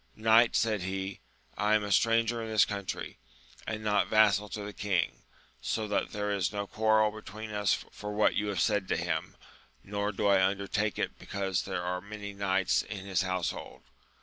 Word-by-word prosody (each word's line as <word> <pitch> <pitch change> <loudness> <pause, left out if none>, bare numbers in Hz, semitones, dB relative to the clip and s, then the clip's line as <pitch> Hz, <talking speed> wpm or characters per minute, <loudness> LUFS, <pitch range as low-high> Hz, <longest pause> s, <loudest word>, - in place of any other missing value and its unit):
Knight, 110 +2 +5
said 110 -3 +2
he, 95 +1 -4 0.4
I 105 +1 +2
am 105 - +2
a 105 - -4
stranger 115 +2 +3
in 110 - -5
this 110 -2 +5
country, 100 - -5 0.5
and 110 -1 -3
not 105 -1 +2
vassal 105 -1 +4
to 105 +2 -5
the 105 0 -6
king, 100 -3 -1 0.4
so 110 +10 -2
that 105 - 0
there 105 0 -2
is 100 -3 0
no 100 -1 -3
quarrel 110 +1 +3
between 110 +1 -8
us 105 -1 +2 0.2
for 105 0 -6
what 105 0 +3
you 105 - -1
have 100 -4 -1
said 105 -3 +1
to - - 0
him, - - -2 0.5
nor 100 +1 -2
do 105 +1 -2
I 100 -2 +5
undertake 100 +2 0
it - - -1
he - - -12
cause 95 -2 -1
there 95 -2 -3
are 90 +1 -2
many 100 0 -7
knights 95 -2 +1
in 100 -3 -7
his 95 -3 +1
household. 95 -2 -3
105 Hz, 190 wpm, -30 LUFS, 95-110 Hz, 0.5 s, Knight